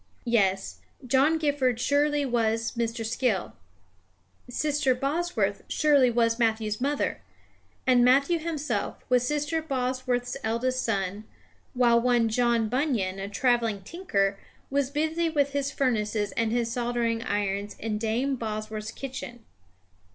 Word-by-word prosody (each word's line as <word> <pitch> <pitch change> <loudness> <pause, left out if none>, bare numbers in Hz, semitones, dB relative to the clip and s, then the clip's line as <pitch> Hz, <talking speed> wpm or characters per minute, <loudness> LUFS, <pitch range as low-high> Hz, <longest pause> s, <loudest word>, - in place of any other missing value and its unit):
Yes; 195 -5 +1 0.3
John 275 +5 +3
Gifford 280 -6 +1
surely 290 +2 +2
was 230 -2 0
Mr. 230 -1 -2
Skill. 225 -4 -1 1.0
Sister 285 0 +1
Bosworth 320 +7 -1
surely 285 -5 +4
was 230 0 +1
Matthew's 220 -1 0
mother. 285 +2 -1 0.6
And 250 -2 +5
Matthew 280 +7 +4
himself 310 -2 -3
was 250 -1 +3
Sister 295 +3 -1
Bosworth's 255 -3 -2
eldest 250 +3 0
son, 200 -1 -2 0.5
while 235 -1 +4
one 240 -2 +3
John 235 -1 +2
Bunyan, 225 -7 0
a 195 +1 -4
travelling 230 -3 +1
tinker, 200 - -1 0.3
was 280 -1 +1
busy 315 +3 0
with 285 -3 +1
his 280 0 -1
furnaces 215 -6 0
and 230 -1 0
his 235 -1 0
soldering 235 -2 -1
irons 205 -1 -2
in 215 -1 -3
Dame 235 +5 0
Bosworth's 215 -1 -4
kitchen. 240 -3 -7
245 Hz, 120 wpm, -27 LUFS, 220-275 Hz, 1.0 s, And